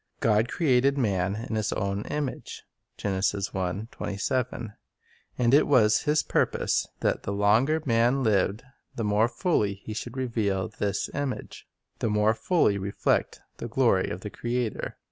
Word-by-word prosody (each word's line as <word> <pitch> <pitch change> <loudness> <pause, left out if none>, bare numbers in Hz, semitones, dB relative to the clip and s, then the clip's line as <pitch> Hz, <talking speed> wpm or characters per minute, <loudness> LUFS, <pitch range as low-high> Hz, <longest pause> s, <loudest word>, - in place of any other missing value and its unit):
"God 110 +1 +2
created 140 -3 +2
man 100 -6 0
in - - -5
His 110 -1 0
own 100 0 -2
image, 145 -3 -4 0.3
f - - -10
0r 100 +5 -2
Man 110 -3 -7 0.6
and 120 0 +2
it 145 - +5
was 110 -7 +4
His 150 +1 +2
purpose - - 0
that - - +1
the - - -4
longer 110 +10 +2
man 120 +2 +2
lived, 105 0 +1 0.3
the 115 - -3
more 105 +2 +3
fully 115 - 0
he 100 +2 -8
should 120 +4 -6
reveal 110 -7 -1
this 100 -1 -2
image, 140 -3 -4 0.2
— - - -46
the - - 0
more 105 +1 +3
fully 110 - +1
reflect 100 +1 -1 0.2
the - - -5
glory 115 -5 +2
of 90 - -5
the 105 - -6
Creator. 120 -1 -3
110 Hz, 150 wpm, -27 LUFS, 100-125 Hz, 0.6 s, it